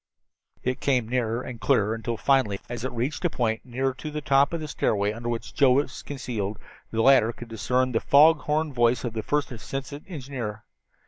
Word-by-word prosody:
It 130 0 -1
came 125 -5 +1
nearer 120 -1 -1
and 120 -3 -8
clearer 105 0 +2
until 115 +1 -3
finally, 130 -8 +2
as 120 -1 -5
it 130 - -2
reached 125 +8 -3
a 175 - +3
point 115 -6 -1
near 130 +2 -1
to 155 +4 -7
the 150 0 -4
top 140 0 +3
of 170 - -2
the 155 - -5
stairway 105 -7 0
under 120 +1 -5
which 115 -1 -4
Joe 135 -3 +5
was 135 0 0
concealed, 115 -7 -4 0.3
the 115 0 0
latter 130 -4 +6
could 120 0 -11
discern 125 +3 0
the 115 - +1
fog 150 +2 +6
horn 150 0 -1
voice 120 -1 +2
of 120 -3 -3
the 110 - -2
first 145 +4 -1
assistant 135 +4 -6
engineer. 125 - -6
125 Hz, 200 wpm, -26 LUFS, 115-140 Hz, 0.3 s, latter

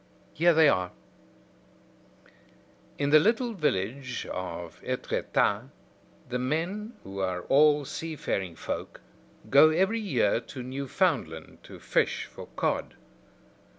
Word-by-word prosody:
Here 170 +2 +4
they 160 -1 +7
are: 90 -8 +2 2.1
"In 140 0 0
the 155 - +9
little 230 +6 +1
village 130 - -2
of 85 -2 -6
Etretat, - - 0 0.6
the 125 0 -2
men, 175 - -2
who 100 0 -7
are 95 -2 -1
all 145 0 +4
seafaring 130 - -3
folk, - - -5 0.5
go 140 +3 +8
every 190 +8 +2
year 125 - +1
to 125 +2 -9
Newfoundland 130 - -2
to - - -11
fish - - 0
for - - -11
cod. - - -1
140 Hz, 110 wpm, -28 LUFS, 100-165 Hz, 2.1 s, the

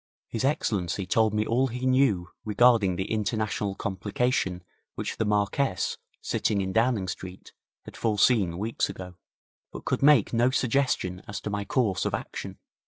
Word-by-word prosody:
His 115 - -3
Excellency 100 - 0
told 110 +3 +2
me 105 0 0
all 125 +4 +2
he 125 +1 -4
knew 130 -9 +2
regarding 110 -3 +4
the 95 - -4
international 105 -2 -1
complication 100 -1 -1 0.3
which - - -4
the 110 - 0
Marquess, 105 +1 0 0.2
sitting 105 - 0
in 95 -1 -2
Downing 115 -3 +2
Street, 90 0 -8 0.3
had - - -11
foreseen 105 -5 +2
weeks 110 +4 -1
ago, 90 -1 -8 0.6
but - - -9
could - - -1
make 140 -7 +5
no 120 +2 +3
suggestion 130 -8 0
as 105 0 -5
to 105 - -4
my 100 0 -2
course 120 -9 +1
of - - 0
action. - - -6
105 Hz, 155 wpm, -27 LUFS, 95-125 Hz, 0.6 s, make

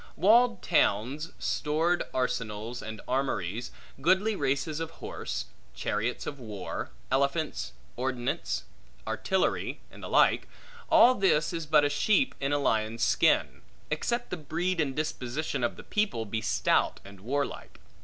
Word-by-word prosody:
Walled 230 +1 +4
towns, 145 - +1
stored 160 +4 +1
arsenals 115 -2 -2
and 110 -1 -7
armories, 120 -4 -1 0.3
goodly 190 +7 +3
races 145 0 -1
of 165 -1 -3
horse, - - -5 0.3
chariots 110 +4 -2
of 140 - -5
war, 105 -6 -5 0.2
elephants, 140 +4 0 0.2
ordnance, 125 -1 -2 0.4
artillery, 110 - 0
and - - -13
the - - -6
like; - - +4 0.4
all 315 -7 +7
this 190 -9 +2
is 165 -2 -3
but 150 -1 +5
a - - +2
sheep 215 - +2
in 140 +1 -1
a 145 - +3
lion's 115 -4 0
skin, - - +3 0.3
except 235 +10 -1
the - - -2
breed 165 +3 -1
and 135 -3 -1
disposition 145 -2 -2
of 120 - 0
the - - -11
people, 205 - 0
be 110 +1 -2
stout 105 -2 +2
and 100 -1 -12
warlike. 140 +8 -3
140 Hz, 135 wpm, -29 LUFS, 115-170 Hz, 0.4 s, all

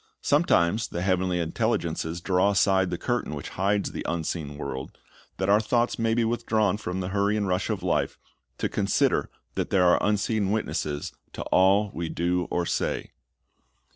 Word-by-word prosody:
Sometimes 95 +7 +3
the 85 - -4
heavenly 95 -1 +1
intelligences 80 0 -1
draw 95 +2 +2
aside 95 -2 +3
the 90 - -2
curtain 120 -6 -2
which 75 - -6
hides 100 +2 0
the - - -5
unseen 80 -3 -3
world, 65 -2 -6 0.4
that 95 - -1
our 100 +1 +5
thoughts 120 +2 0
may 115 0 +2
be 115 -1 +2
withdrawn 110 -3 +1
from 95 -3 -4
the 90 - -3
hurry 100 +2 +1
and 100 -2 0
rush 90 0 0
of - - -2
life, - - 0 0.4
to - - 0
consider - - +1 0.2
that - - -2
there 95 -2 +3
are 90 - +4
unseen 105 0 +1
witnesses 75 -8 -2 0.2
to - - -5
all 100 +2 +4
we 85 -1 -3
do 90 +1 0
or 90 - 0
say. - - -2
95 Hz, 170 wpm, -26 LUFS, 85-105 Hz, 0.4 s, our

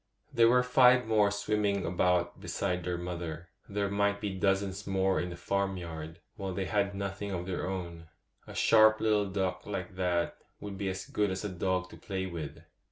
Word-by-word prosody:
'] - - -37
There 115 0 +6
were 125 +1 +5
five 125 0 +5
more 110 -2 +4
swimming 105 -1 0
about 90 0 +1
beside 90 -2 -2
their 90 0 -2
mother; 85 -1 -5 0.2
there 100 0 0
might 100 0 +1
be 100 -2 -3
dozens 95 0 0
more 95 0 +2
in 90 - -3
the 85 - -6
farmyard, 85 -4 -3 0.2
while 95 -3 -4
they 95 - -1
had 100 -1 0
nothing 100 +1 -4
of 90 -2 -3
their 90 -1 -3
own. 85 -3 -5 0.4
A - - -9
sharp 110 -1 +6
little 105 -2 +2
duck 95 -1 -1
like 95 -3 -4
that 90 -2 0 0.2
would 105 -1 -6
be 95 0 -2
as 95 0 -4
good 105 -1 0
as 95 +2 -3
a - - -1
dog 95 0 -1
to - - -11
play 95 -2 -4
with. 80 -3 -6
95 Hz, 190 wpm, -30 LUFS, 90-100 Hz, 0.4 s, There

